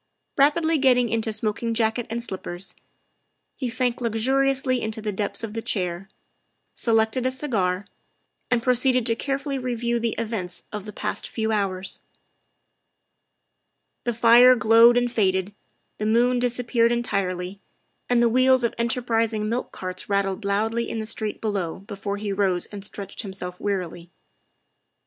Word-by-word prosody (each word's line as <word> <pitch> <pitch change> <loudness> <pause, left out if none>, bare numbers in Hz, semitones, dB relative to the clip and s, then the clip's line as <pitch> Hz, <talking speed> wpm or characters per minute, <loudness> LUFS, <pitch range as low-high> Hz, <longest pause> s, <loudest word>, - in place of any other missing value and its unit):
Rapidly 315 +3 +3
getting 250 -3 +4
into 225 0 -1
smoking 215 +2 -2
jacket 225 +1 +1
and 235 +1 -3
slippers, 185 -3 -6 0.8
he 255 -3 -3
sank 250 0 -1
luxuriously 260 +3 +1
into 220 0 -3
the 215 -1 -3
depths 205 +3 -2
of 215 -2 -5
the 225 - -3
chair, 185 -2 -2 0.6
selected 225 +2 +1
a - - +2
cigar, 210 -9 -1 0.6
and 245 -2 +1
proceeded 250 0 +3
to 230 - +3
carefully 275 +2 -2
review 240 -1 -1
the 230 -1 -1
events 215 -6 -4
of 210 -2 -6
the 210 - -7
past 210 +1 -3
few 220 -1 -2
hours. 195 -3 -1 2.1
The 240 - +1
fire 240 +2 +7
glowed 230 +1 +6
and 245 0 +1
faded, 190 -3 +1 0.5
the 215 - -1
moon 245 +3 +3
disappeared 240 -1 +2
en 240 0 0
tirely, 185 -2 -2 0.5
and 240 -1 +4
the - - +5
wheels 255 +2 +4
of 235 - +1
enterprising 230 -2 0
milk 240 +2 -2
carts 185 +1 -6
rat 200 0 +2
tled 195 +2 -4
loudly 220 +4 0
in - - -4
the 220 - -3
street 215 -1 -3
below 200 -6 -2
before 200 0 -5
he 205 -1 -3
rose 190 -3 +1
and 205 -2 -9
stretched 200 -1 -6
himself 190 -3 -7
wearily. 175 -4 -3
225 Hz, 150 wpm, -24 LUFS, 200-245 Hz, 2.1 s, fire